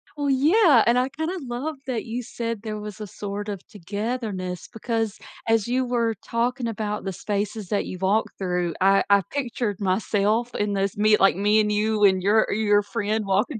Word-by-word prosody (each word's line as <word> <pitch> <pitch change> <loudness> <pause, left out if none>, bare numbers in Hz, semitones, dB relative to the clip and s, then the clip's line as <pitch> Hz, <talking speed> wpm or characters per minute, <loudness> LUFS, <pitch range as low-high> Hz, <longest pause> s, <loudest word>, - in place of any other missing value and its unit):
Well, 290 -1 -1
yeah, 290 - +5
and 240 +1 +4
I 255 +2 +1
kinda 320 +6 -3
love 265 +5 -4
that 245 -4 -3
you 240 +2 -4
said 230 -2 -4
there 215 -1 -5
was 210 0 -8
a 210 - -5
sort 205 +2 -5
of 200 -3 -6
togetherness, 205 -2 -4
because 225 -1 -2 0.3
as 225 -2 +2
you 255 +1 +1
were 235 -2 0
talking 240 +1 -1
about 210 -2 -3
the 195 - -3
spaces 205 +2 -3
that 205 - 0
you 185 - -6
walked 200 +3 0
through, 180 -3 -1
I 195 +1 +5
I 200 0 +6
pictured 240 -7 -2
myself 210 +4 0
in 205 0 0
this 195 0 -1
me 215 0 +4
like, 195 -3 +4
me 210 +2 +3
and 210 0 +2
you 210 0 +1
and 190 -2 +5
your 215 +2 +3
your 205 -1 +3
friend 215 0 -2
walking 210 +6 0
215 Hz, 190 wpm, -24 LUFS, 200-235 Hz, 0.3 s, I